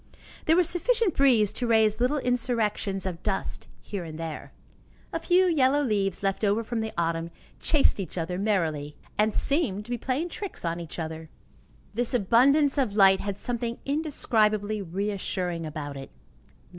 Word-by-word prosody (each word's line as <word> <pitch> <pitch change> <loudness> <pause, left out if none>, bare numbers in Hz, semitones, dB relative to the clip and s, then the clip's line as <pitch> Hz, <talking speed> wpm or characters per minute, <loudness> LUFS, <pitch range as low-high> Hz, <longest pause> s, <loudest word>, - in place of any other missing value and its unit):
There 320 - +4
was 355 -2 +4
sufficient 435 +2 +1
breeze 240 -7 +4
to 245 - -2
raise 220 -1 +3
little 255 +5 +2
insurrections 230 -6 0
of 180 -2 -4
dust 195 -2 -2 0.2
here 200 -4 -5
and 160 -2 -8
there. 165 -2 -6 0.6
A 330 - -1
few 355 +3 +3
yellow 290 -4 +3
leaves, 200 -6 -1
left 195 +2 -1
over 210 +2 +2
from 230 0 -3
the 220 0 -3
autumn, 165 0 -1 0.3
chased 295 -8 +2
each 185 -1 -5
other 180 +2 -2
merrily, 160 -8 -1 0.2
and 215 0 +2
seemed 250 - +1
to 240 - -9
be 240 - -2
playing 275 +8 -2
tricks 390 - -6
on 170 +1 -1
each 170 -2 -8
other. 160 -1 -5 0.6
This 240 +3 -1
abundance 270 +7 +4
of 230 -7 0
light 195 -2 +6
had 200 -1 -4
something 235 0 -3
indescribably 215 -8 +1
reassuring 185 -2 -3
about 145 -2 -6
it. 135 - -8
215 Hz, 160 wpm, -27 LUFS, 185-260 Hz, 0.6 s, light